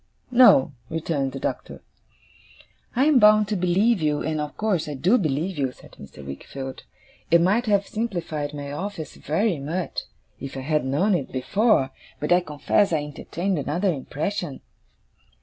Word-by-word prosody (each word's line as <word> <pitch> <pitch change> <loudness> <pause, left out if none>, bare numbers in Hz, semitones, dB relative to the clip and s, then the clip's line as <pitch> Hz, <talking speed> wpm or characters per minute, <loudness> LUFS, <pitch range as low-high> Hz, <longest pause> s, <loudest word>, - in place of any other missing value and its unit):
'No,' 235 - +6 0.2
returned 155 -4 -1
the 135 - -6
Doctor. - - -5 1.1
'I 260 +3 +3
am 300 -4 +5
bound 210 -1 +6
to 215 - 0
believe 190 +4 +2
you, 150 -1 0
and 155 0 -1
of 150 -1 -6
course 195 -8 0
I 145 - -4
do 185 - +3
believe 160 +1 -1
you,' 135 -2 0
said - - -17
Mr. 70 0 -12
Wickfield. 130 - -7 0.4
'It 170 - +6
might 205 +8 +2
have 200 -1 +3
simplified 170 -9 -3
my 145 -1 -6
office 165 -1 -5
very 175 +2 0
much, 165 +6 -3 0.4
if 135 0 -7
I - - -4
had 150 +1 0
known 150 +11 +2
it 145 -7 -1
before. 140 - +2 0.3
But 150 - -3
I 175 - +6
confess 175 +5 +1
I 155 -3 +1
entertained 170 +5 -3
another 170 +7 0
impression. 150 +2 -4
165 Hz, 160 wpm, -24 LUFS, 145-200 Hz, 1.1 s, No